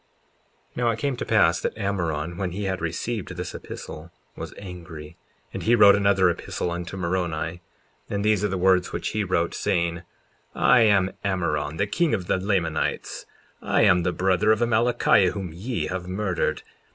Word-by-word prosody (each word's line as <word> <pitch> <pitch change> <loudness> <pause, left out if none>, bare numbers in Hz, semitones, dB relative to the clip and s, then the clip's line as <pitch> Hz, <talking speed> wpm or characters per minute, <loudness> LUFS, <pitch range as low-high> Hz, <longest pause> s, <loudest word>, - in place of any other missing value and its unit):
54:15 - - -14
Now 120 -1 +2
it 115 - -1
came 135 +3 -1
to - - -5
pass 85 -7 +3
that - - -3
Ammoron, 85 -6 -2
when 90 -1 -3
he 100 +2 -4
had 95 -2 -2
received 90 +3 -3
this 90 0 -5
epistle, 75 +2 -9 0.2
was - - -7
angry; 85 -5 -9 0.4
and - - -4
he 120 +2 +3
wrote 100 -3 +8
another 100 -2 +3
epistle 85 0 -2
unto 85 +2 -5
Moroni, 85 -2 -2 0.5
and 100 0 -2
these 105 -2 +2
are - - +3
the 95 -1 -2
words 90 0 +3
which - - -3
he 105 -1 -1
wrote, 85 -3 0
saying: 85 0 0 0.6
54:16 - - -7
I 125 - +6
am 100 -4 +4
Ammoron, 80 -6 -1
the 100 - +1
king 150 +8 +1
of 95 -4 -5
the 95 - +1
Lamanites; 95 -5 -2 0.3
I - - +2
am 90 - +5
the 90 +1 0
brother 95 +4 +2
of 110 - +3
Amalickiah 115 -4 +3
whom 95 -5 -5
ye 115 +8 -3
have 90 -1 -4
murdered. 95 -1 -1
95 Hz, 180 wpm, -24 LUFS, 85-105 Hz, 0.6 s, wrote